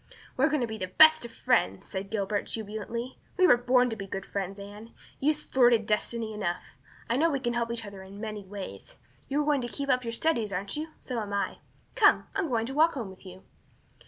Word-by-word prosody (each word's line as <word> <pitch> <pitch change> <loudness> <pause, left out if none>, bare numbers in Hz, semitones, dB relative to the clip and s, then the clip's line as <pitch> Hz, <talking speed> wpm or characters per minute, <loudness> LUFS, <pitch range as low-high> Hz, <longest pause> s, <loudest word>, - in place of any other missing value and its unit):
"We 260 - 0
are - - +7
going 300 -3 +1
to 240 - 0
be 220 -1 -6
the 185 - -2
best 315 +8 +7
of 235 - -8
friends," 95 - +1
said 195 +1 -5
Gilbert, 205 -1 -1
jubilantly. 225 +3 -5 0.2
"We 370 - +6
were 305 - +8
born 250 +1 +3
to - - -2
be 195 -2 -7
good 195 0 -5
friends, 195 0 -4
Anne. 205 +3 -10 0.2
You've 300 +2 +2
thwarted 245 -6 +3
destiny 220 +1 -1
enough. 175 -8 -4 0.3
I 235 - +1
know 330 +4 +4
we 280 -3 0
can 240 -2 -1
help 235 -1 -1
each 230 -2 -3
other 200 -1 -9
in 195 +1 -11
many 215 -2 -5
ways. 200 - -9 0.3
You 285 +2 +1
are - - -4
going 290 -3 +2
to 240 - -3
keep 280 +3 -5
up 255 -1 +3
your 230 - -3
studies, 230 -6 +1
aren't 195 +1 -3
you? 305 +2 -3
So 250 -3 -3
am 205 -2 -4
I. 200 - -1 0.3
Come, - - +5
I'm 395 -3 0
going 230 -3 +1
to 265 - -5
walk 320 +3 +4
home 230 -8 -5
with 190 +1 -14
you." 185 +1 -11
230 Hz, 235 wpm, -28 LUFS, 200-260 Hz, 0.3 s, were